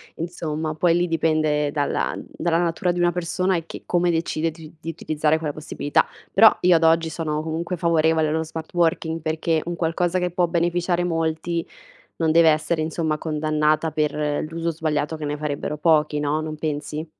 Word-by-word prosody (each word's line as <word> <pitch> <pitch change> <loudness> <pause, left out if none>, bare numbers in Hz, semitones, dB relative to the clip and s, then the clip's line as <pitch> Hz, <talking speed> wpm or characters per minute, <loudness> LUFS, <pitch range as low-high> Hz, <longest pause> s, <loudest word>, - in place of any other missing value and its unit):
insomma, 160 -2 -3
poi 170 +2 +2
lì 175 0 +1
dipende 155 -2 +1
dalla 145 -1 -1
dalla 170 -1 -1
natura 175 +1 0
di 175 - -3
una 175 0 +3
persona 180 +2 0
e 165 - -5
che - - -9
come 175 0 +1
decide 165 -1 -1
di 160 0 -12
di 165 - -5
utilizzare 155 -1 0
quella 150 -2 -3
possibilità. 150 -1 0 0.3
Però 220 +3 +7
io 180 -1 +5
ad 165 - +2
oggi 165 0 +4
sono 155 -1 -3
comunque 165 +3 -3
favorevole 160 -2 +2
allo 160 +1 0
smart 160 +1 -8
working, 165 -1 0
perché 160 0 0
un 175 - -3
qualcosa 170 +2 0
che 180 -1 -1
può 175 0 +1
beneficiare 175 +1 0
molti 165 0 -1 0.5
non 160 -1 +2
deve 165 -1 +6
essere 155 +1 0
insomma 155 -1 -1
condannata 155 0 0
per 150 -1 -1
l'uso 165 +1 -2
sbagliato 155 -1 -2
che 155 - -6
ne 145 0 -2
farebbero 150 0 -3
pochi, 150 -1 +2
no, 150 +1 0
non 155 0 -4
pensi? 150 +1 -4
160 Hz, 180 wpm, -23 LUFS, 155-170 Hz, 0.5 s, Però